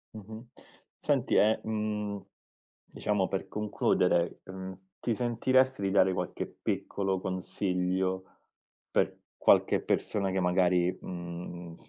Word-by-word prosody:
Mh-mh. 110 Hz, +3 st, -9 dB, 0.5 s
Senti -, -, +1 dB
e, 110 Hz, +1 st, +5 dB
mhmm, 105 Hz, -2 st, -2 dB, 0.7 s
diciamo 105 Hz, -3 st, 0 dB
per 95 Hz, -, -3 dB
concludere, 105 Hz, -4 st, +1 dB
uhm, 95 Hz, 0 st, -7 dB, 0.2 s
ti 120 Hz, -, 0 dB
sentiresti 125 Hz, +1 st, +2 dB
di 95 Hz, -, +1 dB
dare 95 Hz, -1 st, +4 dB
qualche -, -, -3 dB
piccolo 95 Hz, -1 st, -2 dB
consiglio 95 Hz, 0 st, -1 dB, 0.7 s
per -, -, +1 dB, 0.2 s
qualche -, -, +4 dB
persona 100 Hz, -2 st, 0 dB
che 95 Hz, -, 0 dB
magari, 90 Hz, 0 st, +3 dB
mhmm, 85 Hz, -1 st, -7 dB
95 Hz, 105 wpm, -30 LUFS, 90-105 Hz, 0.7 s, e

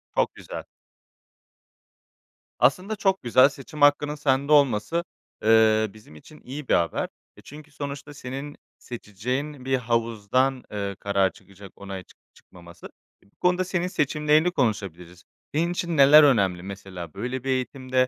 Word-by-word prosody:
Çok -, -, +1 dB
güzel. -, -, -8 dB, 2.0 s
Aslında 180 Hz, -, +2 dB
çok 195 Hz, -2 st, 0 dB
güzel, 130 Hz, +3 st, +5 dB
seçim 145 Hz, +1 st, -11 dB
hakkının 145 Hz, +1 st, +4 dB
sende 140 Hz, -1 st, 0 dB
olması, 145 Hz, +3 st, +3 dB, 0.4 s
eee, 110 Hz, 0 st, +5 dB
bizim 105 Hz, -8 st, -16 dB
için 150 Hz, -, -15 dB
iyi 135 Hz, +2 st, -8 dB
bir -, -, +2 dB
haber; 85 Hz, -1 st, +1 dB, 0.3 s
e, -, -, -14 dB
çünkü 150 Hz, +1 st, -13 dB
sonuçta 140 Hz, 0 st, -7 dB
senin 140 Hz, +2 st, -7 dB, 0.2 s
seçeceğin 125 Hz, +5 st, -5 dB
bir 135 Hz, 0 st, +1 dB
havuzdan, 115 Hz, +2 st, 0 dB
eee, 100 Hz, -1 st, -3 dB
karar 100 Hz, -2 st, +1 dB
çıkacak, 100 Hz, -1 st, -15 dB
onay 95 Hz, -2 st, -8 dB
çık -, -, -23 dB, 0.2 s
çıkmaması. 85 Hz, -1 st, -14 dB, 0.3 s
İii, 100 Hz, -, -28 dB
bu -, -, -43 dB
konuda 180 Hz, 0 st, +2 dB
senin 180 Hz, -1 st, -2 dB
seçimlerini 150 Hz, 0 st, +2 dB
konuşabiliriz. 90 Hz, -, -3 dB, 0.3 s
Senin 165 Hz, +4 st, +1 dB
için 170 Hz, -2 st, -2 dB
neler 145 Hz, +2 st, +8 dB
önemli 100 Hz, -10 st, +3 dB
mesela, 95 Hz, -4 st, -8 dB
böyle 125 Hz, +1 st, -4 dB
bir 135 Hz, -, -4 dB
eğitimde; 130 Hz, 0 st, 0 dB
130 Hz, 140 wpm, -25 LUFS, 105-150 Hz, 2.0 s, neler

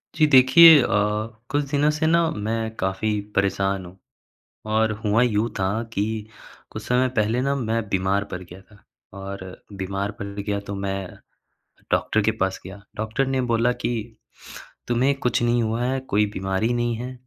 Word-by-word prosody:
जी, 155 Hz, -, +4 dB
देखिए 145 Hz, +3 st, +8 dB
अ, -, -, 0 dB, 0.6 s
कुछ 145 Hz, 0 st, 0 dB
दिनों 145 Hz, 0 st, +2 dB
से 150 Hz, +1 st, -2 dB
ना 170 Hz, 0 st, +3 dB
मैं 110 Hz, -2 st, -3 dB
काफ़ी 95 Hz, +3 st, -1 dB, 0.2 s
परेशान 100 Hz, -1 st, 0 dB
हूँ 90 Hz, +2 st, -13 dB, 0.8 s
और 110 Hz, 0 st, +2 dB
हुआ 105 Hz, +3 st, +3 dB
यूँ 115 Hz, -2 st, +1 dB
था 95 Hz, -1 st, +1 dB, 0.2 s
कि 100 Hz, -2 st, 0 dB, 0.7 s
कुछ -, -, -7 dB
समय 125 Hz, +1 st, +2 dB
पहले 110 Hz, +3 st, +1 dB
ना, 140 Hz, +2 st, 0 dB
मैं 115 Hz, -4 st, -1 dB
बीमार 100 Hz, +1 st, 0 dB
पड़ 90 Hz, -, -5 dB
गया 90 Hz, +1 st, -12 dB
था 100 Hz, +1 st, -22 dB, 0.4 s
और 95 Hz, -1 st, -8 dB
बीमार 100 Hz, +1 st, -3 dB
पड़ 100 Hz, -, -5 dB
गया, 100 Hz, 0 st, -2 dB
तो 100 Hz, 0 st, -7 dB
मैं 95 Hz, -1 st, -3 dB, 0.8 s
डॉक्टर 110 Hz, -, +1 dB
के 110 Hz, -, +2 dB
पास 95 Hz, 0 st, 0 dB
गया। 95 Hz, +2 st, -10 dB
डॉक्टर 110 Hz, +5 st, -1 dB
ने 135 Hz, -1 st, 0 dB
बोला 115 Hz, +2 st, +2 dB
कि, 120 Hz, -, 0 dB, 0.9 s
"तुम्हें 125 Hz, +4 st, +2 dB
कुछ 125 Hz, -, 0 dB
नहीं 120 Hz, 0 st, +2 dB
हुआ 115 Hz, +2 st, -1 dB
है, 130 Hz, +1 st, 0 dB
कोई 105 Hz, -5 st, +1 dB
बीमारी 95 Hz, +5 st, -1 dB
नहीं 120 Hz, -1 st, 0 dB
है, 125 Hz, +3 st, -6 dB
110 Hz, 165 wpm, -23 LUFS, 100-125 Hz, 0.9 s, देखिए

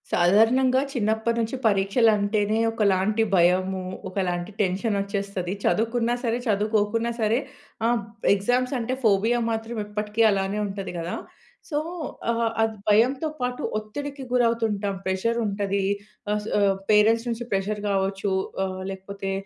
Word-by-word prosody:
సాధారణంగా 230 Hz, +9 st, +4 dB
చిన్నప్పటినుంచి 225 Hz, 0 st, 0 dB
పరీక్షలంటేనే 210 Hz, +1 st, +2 dB
ఒకలాంటి 210 Hz, 0 st, +2 dB
భయము, 185 Hz, +2 st, +3 dB, 0.3 s
ఒకలాంటి 180 Hz, -1 st, -2 dB
టెన్షనొచ్చేస్తది. 200 Hz, -1 st, -1 dB
చదువుకున్నా 230 Hz, +2 st, +1 dB
సరే, 235 Hz, -1 st, +1 dB
చదువుకోకున్నా 215 Hz, +2 st, +1 dB
సరే 220 Hz, +3 st, +2 dB, 0.5 s
ఆహ్, 235 Hz, 0 st, +2 dB, 0.3 s
ఎగ్జామ్సంటే 250 Hz, +4 st, 0 dB
ఫోబియా 220 Hz, +3 st, +3 dB
మాత్రం 225 Hz, +1 st, -3 dB
ఎప్పటికి 210 Hz, +1 st, -2 dB
అలానే 195 Hz, +1 st, -1 dB
ఉంటది 195 Hz, 0 st, -5 dB
గదా! 170 Hz, +1 st, -3 dB, 0.5 s
సో, 295 Hz, -, -1 dB, 0.5 s
ఆహ్, 230 Hz, 0 st, +1 dB
అది 220 Hz, 0 st, +1 dB
భయంతో 250 Hz, +8 st, +3 dB
పాటు 250 Hz, 0 st, -2 dB, 0.2 s
ఒత్తిడికి 280 Hz, +6 st, -6 dB
గురవుతుంటాం. 225 Hz, -5 st, +1 dB
ప్రెషరుంటది, 200 Hz, 0 st, 0 dB, 0.5 s
ఆహ్, 210 Hz, -, +1 dB
స్ -, -, -8 dB
ఆహ్, 200 Hz, -1 st, +3 dB
పేరెంట్స్ 220 Hz, +2 st, +4 dB
నుంచి 235 Hz, +1 st, -3 dB
ప్రెజర్ 205 Hz, +1 st, -1 dB
గావచ్చు 195 Hz, 0 st, 0 dB, 0.3 s
ఆహ్, 185 Hz, 0 st, -4 dB
లేకపోతే 195 Hz, 0 st, -6 dB
210 Hz, 110 wpm, -25 LUFS, 195-230 Hz, 0.5 s, సాధారణంగా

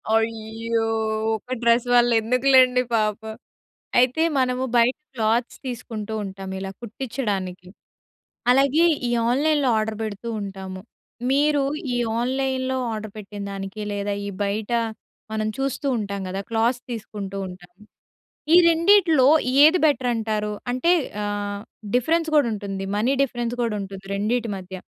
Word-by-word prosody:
అయ్యో! 225 Hz, 0 st, -1 dB, 0.5 s
ఒక 235 Hz, +4 st, -6 dB
డ్రెస్ 235 Hz, +1 st, +3 dB
వల్ల 240 Hz, 0 st, +5 dB
ఎందుకులెండి 250 Hz, +2 st, +4 dB
పాపం. 220 Hz, 0 st, -1 dB, 0.6 s
అయితే, 255 Hz, +6 st, +3 dB, 0.2 s
మనము 255 Hz, 0 st, +1 dB
బయట 235 Hz, +2 st, +4 dB, 0.2 s
క్లాత్స్ 230 Hz, +1 st, 0 dB
తీసుకుంటూ 225 Hz, -3 st, -5 dB
ఉంటాం 195 Hz, -1 st, -7 dB
ఇలా 195 Hz, 0 st, -5 dB
కుట్టించడానికి. 205 Hz, -7 st, -4 dB, 0.8 s
అలాగే 275 Hz, +5 st, +4 dB, 0.2 s
ఈ -, -, -1 dB, 0.2 s
ఆన్‌లైన్‌లొ 285 Hz, +1 st, +2 dB
ఆర్డర్ 215 Hz, 0 st, -2 dB
పెడుతూ 215 Hz, +1 st, -5 dB
ఉంటాము. 190 Hz, -1 st, -7 dB, 0.5 s
మీరు 290 Hz, 0 st, +3 dB, 0.3 s
ఈ -, -, +1 dB, 0.2 s
ఆన్‌లైన్‌లొ 260 Hz, +1 st, -1 dB, 0.2 s
ఆర్డర్ 215 Hz, -1 st, -6 dB
పెట్టిందనికి, 200 Hz, 0 st, -6 dB
లేదా 205 Hz, 0 st, -2 dB
ఈ -, -, -3 dB
బయట 205 Hz, +2 st, -2 dB, 0.6 s
మనం 215 Hz, 0 st, -1 dB
చూస్తూ 275 Hz, +1 st, -2 dB
ఉంటాం 200 Hz, -1 st, -4 dB
కదా! 195 Hz, +1 st, -3 dB
క్లాత్స్ 235 Hz, +2 st, +1 dB
తీసుకుంటూ 205 Hz, -3 st, -6 dB
ఉంటాం. 180 Hz, -1 st, -12 dB, 0.8 s
ఈ -, -, +9 dB
రెండిట్లో 335 Hz, -4 st, +5 dB, 0.4 s
ఏది 320 Hz, +4 st, +6 dB
బెటర్ 260 Hz, -4 st, +1 dB
అంటారు? 215 Hz, -2 st, -2 dB, 0.2 s
అంటే 255 Hz, +8 st, +2 dB, 0.3 s
ఆహ్, 205 Hz, 0 st, -3 dB, 0.3 s
డిఫరెన్స్ 320 Hz, +7 st, +2 dB
కూడా 290 Hz, -, +5 dB
ఉంటుంది. 195 Hz, -2 st, -5 dB
మనీ 235 Hz, +6 st, +2 dB
డిఫరెన్స్ 240 Hz, -3 st, -2 dB
కూడా 230 Hz, -2 st, -1 dB
ఉంటుంది 195 Hz, 0 st, -9 dB
రెండిటి 225 Hz, +3 st, -1 dB
మధ్య. 190 Hz, 0 st, -8 dB
225 Hz, 125 wpm, -23 LUFS, 205-255 Hz, 0.8 s, ఈ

